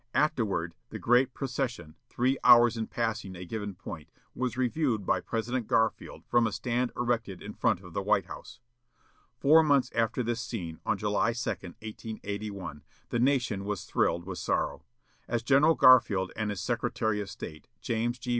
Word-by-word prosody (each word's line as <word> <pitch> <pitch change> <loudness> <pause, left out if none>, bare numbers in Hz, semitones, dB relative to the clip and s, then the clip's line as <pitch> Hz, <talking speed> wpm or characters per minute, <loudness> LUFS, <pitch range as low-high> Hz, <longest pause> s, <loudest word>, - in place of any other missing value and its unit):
Afterward, 110 - +1 0.2
the - - -6
great 125 +2 +3
procession, 125 - -3 0.2
three 130 +2 +1
hours 120 -1 +7
in 110 -1 -3
passing 110 -5 -3
a 90 +1 -8
given 105 +1 -5
point, 85 -3 -9 0.2
was 125 -1 -2
reviewed 125 -4 0
by - - +1
President 115 +1 -2
Garfield 115 0 0
from 120 -1 +3
a - - -3
stand 125 +3 -1
erected 115 -6 -1
in - - -8
front - - +1
of - - -12
the - - -1
White - - +2
House. - - -10 0.8
Four 155 +3 +6
months 140 -5 +3
after 115 +2 0
this 120 0 -2
scene, 95 -9 -5
on 100 - +2
July 105 +3 +1
2, 120 +1 -4
1881, 100 -3 -6 0.3
the 120 - -1
nation 125 -6 +1
was 100 -2 -3
thrilled 85 0 0
with 95 -1 -5
sorrow. - - -1 0.5
As 120 -1 -1
General 140 +5 +5
Garfield 100 -7 +5
and 110 -1 -2
his 100 -3 -3
Secretary 110 -1 -1
of 100 - -6
State, 75 -4 -9
James 120 +2 -1
G. 125 +1 -8
115 Hz, 165 wpm, -29 LUFS, 100-125 Hz, 0.8 s, hours